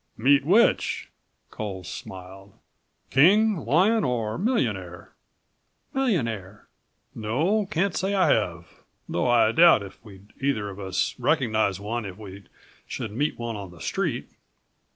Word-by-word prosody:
"Meet 140 +4 +4
which?" 210 +9 +2 0.4
Coles 95 -5 -6
smiled. 95 +1 -10 0.6
"King, 205 +9 +5
lion 180 - +2
or 115 -3 -2
millionaire?" 105 - -2 0.8
"Millionaire." 115 - -2 0.5
"No, 160 - 0
can't 190 +1 -1
say 190 - -1
that 195 - +2
I - - +5
have, 85 -6 -3 0.3
though 85 - -1
I 120 -2 +4
doubt 165 -5 +6
if 95 +2 -12
we'd 100 -1 -15
either 110 -7 -1
of 95 - -11
us 95 -2 -1
recognize 115 - +1
one 110 +2 -4
if 95 -1 -8
we 100 -2 -11 0.4
should 110 - -5
meet 145 +8 -1
him - - -9
on 105 -5 -5
the 85 -1 -15
street. - - -3
115 Hz, 130 wpm, -25 LUFS, 100-160 Hz, 0.8 s, doubt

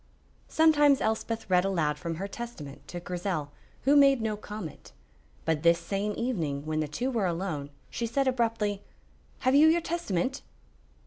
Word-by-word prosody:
Sometimes 295 -3 +5
Elspeth 220 +1 -2
read 180 -2 +4
aloud 160 -6 0
from 170 -2 -3
her 195 +5 -4
Testament 200 -11 -8
to 175 - -6
Grizel, 175 -4 -3 0.3
who 280 +2 +4
made 275 -2 +6
no 220 -1 -1
comment, 210 - -8 0.5
but 160 -2 +1
this 170 +1 +5
same 200 +4 -2
evening, 160 - -2
when 155 0 -1
the 155 - 0
two 245 - -2
were 220 -6 +1
alone, 165 -5 -3 0.2
she 235 - -2
said 270 +4 0
abruptly: 225 -5 0 0.6
"Have 255 - +2
you 295 +3 +7
your 330 +2 +5
Testament?" 270 - -2
205 Hz, 155 wpm, -28 LUFS, 170-250 Hz, 0.6 s, you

